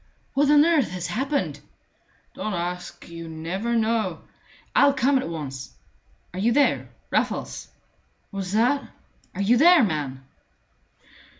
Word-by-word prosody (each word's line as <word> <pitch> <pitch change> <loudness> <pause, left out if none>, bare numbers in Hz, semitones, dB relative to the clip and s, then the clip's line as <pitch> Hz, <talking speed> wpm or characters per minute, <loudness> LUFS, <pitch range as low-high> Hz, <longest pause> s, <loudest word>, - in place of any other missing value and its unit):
"What 285 +1 +3
on 295 0 +6
earth 325 -6 +3
has 180 -1 -5
happened?" 275 +8 -1 0.7
"Don't 215 -3 -3
ask! 175 +1 -5
You 170 -1 -8
never 180 +9 -3
know 220 -6 0 0.2
" - - -28
"I'll 280 0 +6
come 265 +1 +3
at 260 - -4
once. 140 -5 -6 0.6
Are 185 - -5
you 225 +5 +2
there, 285 +2 +2 0.2
Raffles?" - - -1 0.6
"What's 195 -2 -4
that?" 245 +6 +2 0.5
"Are 195 - -2
you 235 +5 +4
there, 335 +1 +7
man?" 145 -8 -2
215 Hz, 130 wpm, -24 LUFS, 170-270 Hz, 0.7 s, there